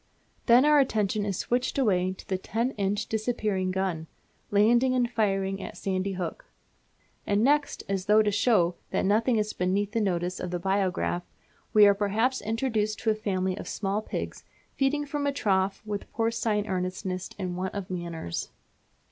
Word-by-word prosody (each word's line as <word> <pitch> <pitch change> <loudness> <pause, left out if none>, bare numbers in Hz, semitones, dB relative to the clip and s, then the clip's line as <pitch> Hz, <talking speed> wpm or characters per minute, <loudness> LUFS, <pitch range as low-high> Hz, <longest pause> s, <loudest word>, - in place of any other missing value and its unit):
Then 245 +3 +7
our 300 -1 +6
attention 215 -5 +1
is 195 -3 -2
switched 250 +3 -1
away 185 -8 +2
to - - -14
the 190 -3 -1
10 230 +6 -1
inch 205 -1 -1
disappearing 215 -4 -1
gun, 185 -4 -2 0.4
landing 240 +5 +4
and 245 -1 +2
firing 195 -4 0
at - - -7
Sandy 190 0 -1
Hook. 190 - -5 0.8
And 205 +1 +2
next, 290 +2 +2
as 195 -1 -2
though 215 +1 +6
to 210 - +1
show 200 -5 +3 0.2
that - - 0
nothing 225 +5 +3
is 215 0 -1
beneath 195 +3 0
the 225 - 0
notice 180 -2 -1
of 180 - -4
the 175 - -2
biograph, 185 -1 0 0.5
we 210 -1 +7
are 200 - +7
perhaps 215 +6 0
introduced 220 -1 -1
to 220 - +2
a - - +3
family 190 -3 -1
of - - -8
small 200 +1 -1
pigs - - -5 0.3
feeding 290 +2 +1
from 285 0 -2
a - - +2
trough 195 -8 0
with 205 -1 -5
porcine 225 -2 0
earnestness 185 0 -3
and 185 -3 -3
want 185 +2 -3
of 195 -2 -5
manners. 170 - -4
205 Hz, 170 wpm, -27 LUFS, 190-230 Hz, 0.8 s, Then